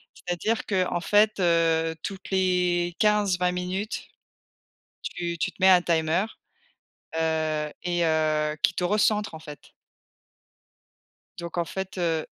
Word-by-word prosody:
C'est-à-dire 180 Hz, +6 st, -2 dB
qu'en 185 Hz, -3 st, 0 dB
fait, 210 Hz, +3 st, +3 dB
heu, 165 Hz, -2 st, +2 dB
toutes 195 Hz, -2 st, -6 dB
les 180 Hz, -2 st, +1 dB
15-20 200 Hz, -4 st, +2 dB
minutes, 180 Hz, +4 st, -4 dB, 0.9 s
tu 170 Hz, -1 st, -4 dB
tu -, -, -1 dB
te -, -, -27 dB
mets 190 Hz, -, +6 dB
un 180 Hz, -1 st, +7 dB
timer, 165 Hz, +2 st, +1 dB, 0.9 s
heu 155 Hz, -2 st, -1 dB
et 175 Hz, -1 st, 0 dB
heu, 155 Hz, -1 st, +1 dB
qui -, -, +3 dB
te -, -, -2 dB
recentre, 210 Hz, +2 st, +1 dB
en 160 Hz, -, -8 dB
fait. 150 Hz, -2 st, -12 dB, 1.7 s
Donc 170 Hz, 0 st, -6 dB
en 170 Hz, -, +1 dB
fait, 190 Hz, +4 st, -6 dB
heu 165 Hz, -3 st, 0 dB
175 Hz, 125 wpm, -26 LUFS, 160-190 Hz, 1.7 s, un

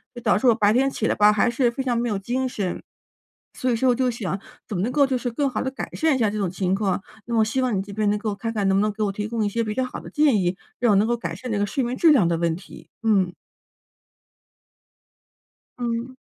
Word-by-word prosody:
就 240 Hz, -, -7 dB
导 215 Hz, -3 st, +3 dB
致 255 Hz, -, +1 dB
我 235 Hz, -, +6 dB
白 210 Hz, -2 st, +3 dB
天 265 Hz, +4 st, +3 dB
起 220 Hz, -, -2 dB
来 -, -, +2 dB
吧， 210 Hz, 0 st, +5 dB
还 215 Hz, +3 st, +2 dB
是 240 Hz, +1 st, +2 dB
非 260 Hz, +3 st, -4 dB
常 245 Hz, -2 st, 0 dB
没 240 Hz, +1 st, 0 dB
有 210 Hz, -4 st, -1 dB
精 250 Hz, +6 st, -2 dB
神。 200 Hz, -7 st, -3 dB, 0.7 s
所 255 Hz, -, -1 dB
以 240 Hz, -, +2 dB
说 255 Hz, +3 st, +2 dB
我 250 Hz, -, +4 dB
就 255 Hz, 0 st, +1 dB
想 205 Hz, -5 st, -3 dB, 0.3 s
怎 210 Hz, -, -3 dB
么 175 Hz, -, -1 dB
能 240 Hz, +5 st, -1 dB
够 285 Hz, -2 st, +4 dB
就 265 Hz, -, 0 dB
是 245 Hz, 0 st, -2 dB
更 280 Hz, +4 st, 0 dB
好 240 Hz, -5 st, -2 dB
地 265 Hz, -, -2 dB
改 265 Hz, -, -6 dB
善 315 Hz, -3 st, +2 dB
一 -, -, 0 dB
下 220 Hz, -3 st, +2 dB
这 210 Hz, -, -3 dB
种 195 Hz, -4 st, -1 dB
情 185 Hz, +1 st, -1 dB
况， 195 Hz, -1 st, 0 dB, 0.2 s
那 240 Hz, -, -7 dB
么 225 Hz, -, +3 dB
我 -, -, +5 dB
希 260 Hz, +4 st, -1 dB
望 250 Hz, -4 st, +1 dB
你 190 Hz, -, 0 dB
这 200 Hz, 0 st, -9 dB
边 210 Hz, 0 st, +1 dB
能 210 Hz, -, +1 dB
够 210 Hz, -1 st, -2 dB
看 225 Hz, +3 st, -4 dB
看 205 Hz, -3 st, 0 dB
能 190 Hz, -, +3 dB
不 200 Hz, -, +3 dB
能 215 Hz, 0 st, +1 dB
给 215 Hz, +1 st, -4 dB
我 205 Hz, -, 0 dB
提 205 Hz, +1 st, -4 dB
供 225 Hz, 0 st, -2 dB
一 -, -, +1 dB
些 230 Hz, +3 st, -1 dB
比 215 Hz, -, -3 dB
较 260 Hz, +4 st, -1 dB
好 -, -, -7 dB
的 -, -, -10 dB
建 295 Hz, -6 st, +3 dB
议， 175 Hz, +1 st, 0 dB, 0.2 s
让 240 Hz, -2 st, +3 dB
我 -, -, +4 dB
能 215 Hz, +3 st, +3 dB
够 240 Hz, -, +1 dB
改 170 Hz, -7 st, -5 dB
善 245 Hz, +8 st, -7 dB
这 210 Hz, -, 0 dB
个 205 Hz, -, +2 dB
睡 235 Hz, +7 st, -1 dB
眠 245 Hz, +1 st, -2 dB
质 330 Hz, -, +5 dB
量 205 Hz, -12 st, +4 dB
的 170 Hz, -, +1 dB
问 165 Hz, -1 st, 0 dB
题， 185 Hz, +4 st, -12 dB
嗯。 195 Hz, -5 st, +2 dB, 2.5 s
嗯。 240 Hz, +1 st, -3 dB
225 Hz, 310 characters per minute, -23 LUFS, 205-250 Hz, 2.5 s, 我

